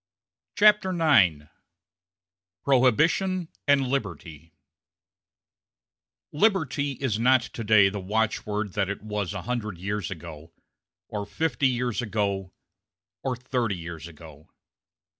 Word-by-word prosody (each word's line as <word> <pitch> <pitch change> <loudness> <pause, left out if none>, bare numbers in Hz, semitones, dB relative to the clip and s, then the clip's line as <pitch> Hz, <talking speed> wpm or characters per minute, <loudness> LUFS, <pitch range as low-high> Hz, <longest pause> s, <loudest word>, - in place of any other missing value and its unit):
CHAPTER 210 -2 +5
IX 95 - +4 1.2
PROHIBITION 160 - +2 0.2
AND 140 -2 +4
LIBERTY 85 - -5 1.8
Liberty 150 - +1
is 125 -5 -2
not 130 +2 +4
to 115 - -7
day 105 -2 +6
the 100 +1 -3
watchword 105 0 -2
that 100 -2 0
it 100 - -5
was 105 -4 -3
a 90 - -5
hundred 110 -5 -3
years 100 +1 -3
ago, 80 -3 -9 0.6
or 105 -1 -5
fifty 140 -1 0
years 125 -1 -1
ago, 100 -4 -2 0.7
or 130 -1 -2
thirty 125 -5 -2
years 85 -1 -8
ago. 80 -2 -14
110 Hz, 105 wpm, -26 LUFS, 95-130 Hz, 1.8 s, day